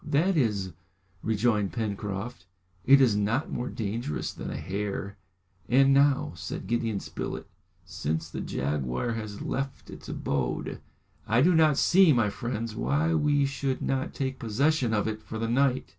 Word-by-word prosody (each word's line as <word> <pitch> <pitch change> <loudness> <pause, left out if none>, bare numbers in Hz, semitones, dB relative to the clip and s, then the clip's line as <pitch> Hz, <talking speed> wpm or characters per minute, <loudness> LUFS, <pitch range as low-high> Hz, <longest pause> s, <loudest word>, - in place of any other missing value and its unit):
"That 175 +7 +2
is," 105 - 0 0.5
rejoined 110 -2 +1
Pencroft, 105 -2 -4 0.4
"it 140 +1 +8
is 120 -6 +4
not 105 +7 0
more 125 +1 -3
dangerous 110 -6 -3
than - - -6
a - - -4
hare!" 100 +4 -4 0.5
"And 135 +2 +5
now," 140 - +3
said 85 +2 -6
Gideon 115 -3 -1
Spilett, - - -5 0.4
"since 80 +2 -3
the 85 - -6
jaguar 70 - -2
has 110 -3 -5
left 135 0 -4
its - - -10
abode, - - -2 0.5
I 115 +4 +3
do 180 +3 +5
not 155 -3 +4
see, 185 -2 +6
my 110 -5 +2
friends, 115 0 -4
why 155 +7 +1
we 145 -3 +3
should 135 -1 -2
not 135 0 -1
take 130 -1 -3
possession 130 +3 +1
of 105 -1 +1
it 110 0 -3
for 110 - -7
the 115 +1 -1
night." 130 +2 +2
115 Hz, 155 wpm, -28 LUFS, 100-135 Hz, 0.5 s, it